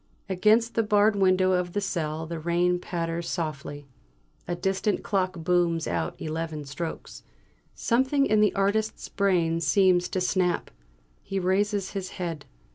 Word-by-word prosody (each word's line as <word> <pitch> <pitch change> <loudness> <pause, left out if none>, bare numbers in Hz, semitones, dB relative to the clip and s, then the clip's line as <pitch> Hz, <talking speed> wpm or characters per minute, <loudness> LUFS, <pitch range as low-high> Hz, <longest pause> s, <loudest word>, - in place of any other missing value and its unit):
Against 215 +5 +3
the 230 - +2
barred 210 -1 +3
window 185 -1 +3
of 180 -1 0
the 205 - 0
cell 160 -5 -2
the 165 0 -5
rain 175 +2 +1
patters 170 -1 -3
softly. 145 -3 -4 0.6
A 175 - -1
distant 190 +3 -1
clock 185 -2 -1
booms 170 -2 +2
out 85 -2 -2
eleven 155 -1 -4
strokes. 160 +4 -6 0.5
Something 265 +4 +2
in 215 -3 +3
the 210 - +3
artist's 205 +3 0
brain 175 -4 +1
seems 180 +3 +3
to 185 - -1
snap. 180 -1 0 0.5
He 195 - -5
raises 195 +1 0
his 195 -2 -5
head. 165 -5 -4
180 Hz, 140 wpm, -26 LUFS, 165-200 Hz, 0.6 s, Against